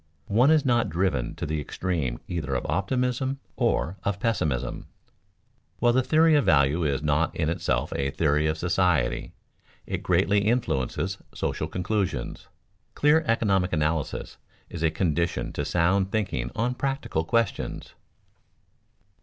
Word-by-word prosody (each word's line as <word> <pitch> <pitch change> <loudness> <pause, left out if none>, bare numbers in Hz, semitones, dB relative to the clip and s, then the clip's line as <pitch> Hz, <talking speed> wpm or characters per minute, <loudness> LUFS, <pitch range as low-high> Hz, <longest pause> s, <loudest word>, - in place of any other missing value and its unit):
One 125 +6 +5
is 155 -2 +4
not 120 -2 +2
driven 80 -8 -1
to - - -4
the 75 0 -2
extreme 75 -6 -2
either 75 -6 -3
of - - -2
optimism 125 +6 -1 0.2
or 90 +5 0
of 100 0 -1
pessimism. 75 - -1 0.9
While 120 +3 +3
the 130 - +4
theory 160 +4 +4
of 145 -2 +4
value 75 +2 +3
is 70 -1 0
not 75 +2 +1
in 80 -1 0
itself - - -1
a 70 0 0
theory 75 +1 +1
of 80 0 -1
society, 85 -6 +1 0.5
it - - -3
greatly 100 +1 +2
influences 95 - -1 0.2
social - - -2
conclusions. 90 - -2 0.5
Clear 150 +2 +4
economic 100 -5 +2
analysis 75 -1 -1 0.3
is 85 - -6
a 80 - +3
condition 85 0 -1
to - - -2
sound 95 +3 +1
thinking 90 - -1
on 120 +2 0
practical 135 - -2
questions. 115 +4 -1
90 Hz, 135 wpm, -26 LUFS, 75-115 Hz, 0.9 s, One